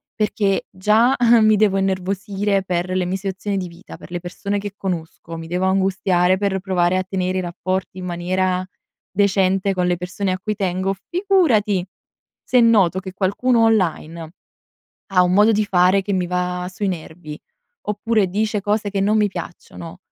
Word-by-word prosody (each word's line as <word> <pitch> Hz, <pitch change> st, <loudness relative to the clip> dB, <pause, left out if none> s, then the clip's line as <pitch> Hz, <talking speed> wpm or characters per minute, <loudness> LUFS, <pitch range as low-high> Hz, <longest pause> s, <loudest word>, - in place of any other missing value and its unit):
perché 205 Hz, -2 st, 0 dB
già 215 Hz, +7 st, +3 dB, 0.3 s
mi 215 Hz, 0 st, +5 dB
devo 200 Hz, -2 st, +3 dB
innervosire 195 Hz, +1 st, -1 dB
per 180 Hz, -1 st, -2 dB
le 185 Hz, -1 st, 0 dB
mie 185 Hz, +2 st, -2 dB
situazioni 195 Hz, +1 st, -3 dB
di 185 Hz, -1 st, -3 dB
vita, 170 Hz, +2 st, -12 dB
per -, -, -14 dB
le 175 Hz, -, -3 dB
persone 200 Hz, +3 st, -4 dB
che 205 Hz, 0 st, -6 dB
conosco, 165 Hz, -2 st, -5 dB
mi 165 Hz, -, -8 dB
devo 180 Hz, +2 st, -1 dB
angustiare 190 Hz, -1 st, +2 dB
per 200 Hz, -1 st, -1 dB
provare 185 Hz, -1 st, +1 dB
a 185 Hz, -, 0 dB
tenere 185 Hz, 0 st, -2 dB
i -, -, -1 dB
rapporti 185 Hz, +2 st, -4 dB
in 180 Hz, -, -6 dB
maniera, 180 Hz, +1 st, -1 dB, 0.5 s
decente 195 Hz, -1 st, +2 dB
con 180 Hz, -1 st, 0 dB
le 180 Hz, -, +2 dB
persone 180 Hz, +2 st, -3 dB
a 185 Hz, -, -4 dB
cui 210 Hz, +2 st, -3 dB
tengo, 190 Hz, -1 st, -1 dB, 0.2 s
figurati 325 Hz, -, +2 dB, 0.6 s
se 250 Hz, -, +2 dB
noto 200 Hz, -6 st, +4 dB
che 190 Hz, -1 st, -8 dB
qualcuno 225 Hz, +6 st, +1 dB
online 170 Hz, -6 st, 0 dB, 0.8 s
ha 180 Hz, -, +5 dB
un 180 Hz, 0 st, +1 dB
modo 210 Hz, +3 st, +5 dB
di 215 Hz, 0 st, +1 dB
fare 185 Hz, 0 st, +3 dB
che 200 Hz, +1 st, -3 dB
mi 180 Hz, -1 st, 0 dB
va 180 Hz, 0 st, -2 dB
sui 205 Hz, +2 st, -3 dB
nervi, 160 Hz, -3 st, -6 dB, 0.5 s
oppure 210 Hz, -1 st, +1 dB
dice 210 Hz, +2 st, -1 dB
cose 210 Hz, 0 st, -1 dB
che 200 Hz, 0 st, -2 dB
non 205 Hz, +2 st, +2 dB
mi 210 Hz, -, +3 dB
piacciono, 170 Hz, -1 st, -9 dB
190 Hz, 170 wpm, -20 LUFS, 180-205 Hz, 0.8 s, mi